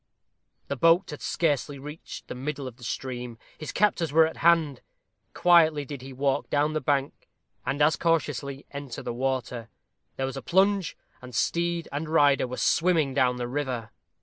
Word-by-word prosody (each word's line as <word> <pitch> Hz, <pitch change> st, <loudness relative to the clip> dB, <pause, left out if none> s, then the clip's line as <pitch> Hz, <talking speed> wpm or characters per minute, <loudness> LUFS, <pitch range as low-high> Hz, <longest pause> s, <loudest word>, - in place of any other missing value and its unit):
The 140 Hz, -, -2 dB
boat 165 Hz, +7 st, +4 dB
had 150 Hz, -, -8 dB
scarcely 145 Hz, -4 st, 0 dB
reached 150 Hz, +4 st, -9 dB
the -, -, -5 dB
middle 140 Hz, +2 st, -4 dB
of 125 Hz, -2 st, -8 dB
the 125 Hz, -, -15 dB
stream. 125 Hz, -1 st, -5 dB, 0.2 s
His 155 Hz, -, -5 dB
captors 185 Hz, -6 st, +1 dB
were 160 Hz, +2 st, +6 dB
at 160 Hz, -, -5 dB
hand. 160 Hz, -5 st, +3 dB, 0.5 s
Quietly 160 Hz, -4 st, +5 dB
did 140 Hz, -1 st, -7 dB
he 135 Hz, +1 st, -9 dB
walk 135 Hz, +1 st, -1 dB
down 150 Hz, +1 st, +1 dB
the 155 Hz, -, -1 dB
bank, 140 Hz, 0 st, -1 dB, 0.4 s
and 140 Hz, +2 st, +1 dB
as 155 Hz, +2 st, +3 dB
cautiously 140 Hz, -4 st, -1 dB
enter 140 Hz, -3 st, -7 dB
the -, -, -3 dB
water. 125 Hz, -2 st, -2 dB, 0.5 s
There 135 Hz, -, -1 dB
was 135 Hz, +1 st, -5 dB
a -, -, -4 dB
plunge, 190 Hz, +4 st, +2 dB, 0.2 s
and 125 Hz, -2 st, -10 dB
steed 170 Hz, +4 st, 0 dB
and 150 Hz, +3 st, -4 dB
rider 145 Hz, -4 st, +4 dB
were 125 Hz, -, -6 dB
swimming 165 Hz, -5 st, +2 dB
down 130 Hz, -2 st, +2 dB
the 120 Hz, -1 st, -3 dB
river. 125 Hz, -4 st, -3 dB
145 Hz, 175 wpm, -27 LUFS, 130-160 Hz, 0.5 s, were